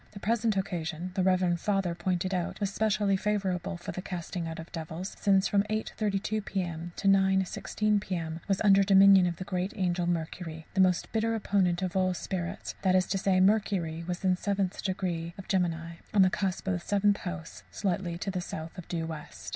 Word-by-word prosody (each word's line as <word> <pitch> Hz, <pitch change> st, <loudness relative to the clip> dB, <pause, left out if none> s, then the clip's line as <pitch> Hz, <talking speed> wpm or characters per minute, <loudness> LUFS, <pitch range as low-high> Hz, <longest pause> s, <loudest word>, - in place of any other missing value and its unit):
The 200 Hz, -, -8 dB
present 225 Hz, 0 st, +1 dB
occasion, 175 Hz, -2 st, -3 dB
the 190 Hz, -, 0 dB
reverend 185 Hz, -2 st, +2 dB
Father 195 Hz, -2 st, 0 dB
pointed 185 Hz, +1 st, -1 dB
out, 180 Hz, -2 st, -2 dB
was 200 Hz, -1 st, -1 dB
specially 210 Hz, -2 st, +2 dB
favourable 190 Hz, -3 st, -1 dB
for 175 Hz, -, -6 dB
the 185 Hz, -, -5 dB
casting 175 Hz, -2 st, -4 dB
out 165 Hz, 0 st, -5 dB
of 165 Hz, +1 st, -9 dB
devils, 165 Hz, +3 st, -6 dB
since 195 Hz, -1 st, +3 dB
from 200 Hz, -, +3 dB
8.32 215 Hz, -1 st, -2 dB
p.m. 175 Hz, -4 st, -3 dB
to 195 Hz, -, -2 dB
9.16 195 Hz, +2 st, +2 dB
p.m. 165 Hz, -4 st, -4 dB
was 195 Hz, -2 st, +1 dB
under 200 Hz, -1 st, +6 dB
the 195 Hz, -, +1 dB
dominion 195 Hz, -2 st, +7 dB
of 170 Hz, -, -2 dB
the 185 Hz, -, -6 dB
great 185 Hz, +1 st, -2 dB
angel 180 Hz, -3 st, 0 dB
Mercury 160 Hz, -1 st, -3 dB
the 190 Hz, -, +3 dB
most 185 Hz, -1 st, +2 dB
bitter 225 Hz, 0 st, +1 dB
opponent 190 Hz, -4 st, +1 dB
of 185 Hz, 0 st, -2 dB
all 190 Hz, -1 st, +3 dB
evil 185 Hz, -, +1 dB
spirits; 185 Hz, +1 st, -4 dB
that 185 Hz, -1 st, +3 dB
is 185 Hz, 0 st, +4 dB
to 195 Hz, -, 0 dB
say, 190 Hz, -1 st, +2 dB
Mercury 185 Hz, -5 st, +2 dB
was 180 Hz, +2 st, -4 dB
in 185 Hz, -1 st, +4 dB
17° 195 Hz, 0 st, 0 dB, 0.6 s
♊. 175 Hz, -4 st, -1 dB, 0.2 s
on 200 Hz, -, +7 dB
the 185 Hz, -, +5 dB
cusp 195 Hz, -2 st, -2 dB
of 180 Hz, -2 st, 0 dB
Seventh 205 Hz, +1 st, +2 dB
House, 175 Hz, -2 st, -7 dB
slightly 180 Hz, -3 st, -2 dB
to 185 Hz, 0 st, -3 dB
south 160 Hz, -1 st, -6 dB
of 175 Hz, -, -9 dB
due 165 Hz, -2 st, -2 dB
west. 160 Hz, -2 st, -7 dB
185 Hz, 190 wpm, -29 LUFS, 175-200 Hz, 0.6 s, dominion